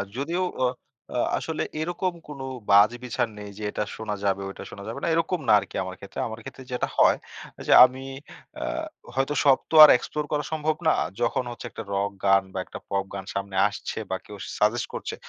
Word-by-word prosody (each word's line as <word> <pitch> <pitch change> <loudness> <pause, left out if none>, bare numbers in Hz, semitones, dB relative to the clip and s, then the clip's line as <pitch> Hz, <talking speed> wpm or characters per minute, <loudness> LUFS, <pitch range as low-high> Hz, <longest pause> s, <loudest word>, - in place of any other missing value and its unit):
যদিও 165 +7 -1 0.2
ও - - +5 0.5
আ - - 0 0.2
আসলে 160 -1 -3 0.2
এরকম 175 +2 -1
কোনো 140 -3 -7 0.3
বাছবিচার 115 +4 +4
নেই 105 -1 -8
যে 110 - -7
এটা 105 - -1
শোনা 110 -2 -4
যাবে, 100 0 +1
ঐটা - - -9
শোনা 100 - -9
যাবে 115 +5 -5
না, - - 0
এরকম 165 +2 +1
না 110 - +6
আরকি - - -10
আমার 95 0 -6
ক্ষেত্রে। 100 - -8
আমার 110 0 -7
ক্ষেত্রে 130 - -10
যেটা 125 - -1
হয় - - +6 0.5
যে - - +2
আমি 130 +1 -5 0.5
অ্যা - - -3 0.5
হয়তো 135 +2 +1
সব 135 -2 +7
তো - - +1
আর 150 - +11
এক্সপ্লোর 150 +4 -4
করা 150 -1 0
সম্ভব 155 0 0
না। 160 - +6 0.3
যখন 120 +2 +1
হচ্ছে 120 - -9
একটা 115 - -7
রক 100 +1 0
গান 95 0 +5
বা, - - -5
একটা - - -9
পপ 100 -1 0
গান 95 -1 -5
সামনে 100 0 -4
আসছে 105 +2 -5
বা, 95 - 0
কেউ 105 - -10 0.2
সাজেস্ট 110 +4 +2
করছে, - - -4
120 Hz, 200 wpm, -25 LUFS, 100-150 Hz, 0.5 s, আর